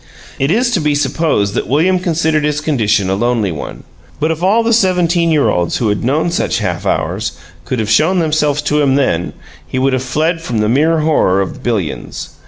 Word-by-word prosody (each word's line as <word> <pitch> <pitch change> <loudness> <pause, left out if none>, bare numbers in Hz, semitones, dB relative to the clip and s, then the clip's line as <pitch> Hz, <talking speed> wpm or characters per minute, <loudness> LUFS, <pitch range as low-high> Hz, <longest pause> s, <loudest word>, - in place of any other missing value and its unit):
It 135 - +1
is 240 +7 +2
to 225 - +1
be 150 -2 0
supposed 135 -7 0
that - - -2
William 170 +8 +2
considered 160 -3 0
his 150 0 0
condition 110 -10 +1
a 95 - 0
lonely 110 -1 0
one, 75 - -7 0.4
but 155 +2 +1
if 160 0 -4
all 205 +6 +3
the 230 0 +1
seventeen 180 -5 +2
year 155 -3 +2
olds 85 -1 0
who 115 - 0
have 105 - -1
known 150 +7 0
such 175 - 0
halfhours - - -2 0.3
could 125 - -2
have 110 -2 -2
shown 155 - +3
themselves 150 -3 +1
to 150 +1 +1
him 135 -2 +2
then, 90 -12 0 0.3
he - - -4
would 135 +1 +1
have 130 - 0
fled 155 +6 -1
from 120 -8 -3
the 105 0 +1
mere 155 +6 +2
horror 150 -12 +2
of 95 - -4
billions. 105 - -3
150 Hz, 200 wpm, -15 LUFS, 120-165 Hz, 0.4 s, all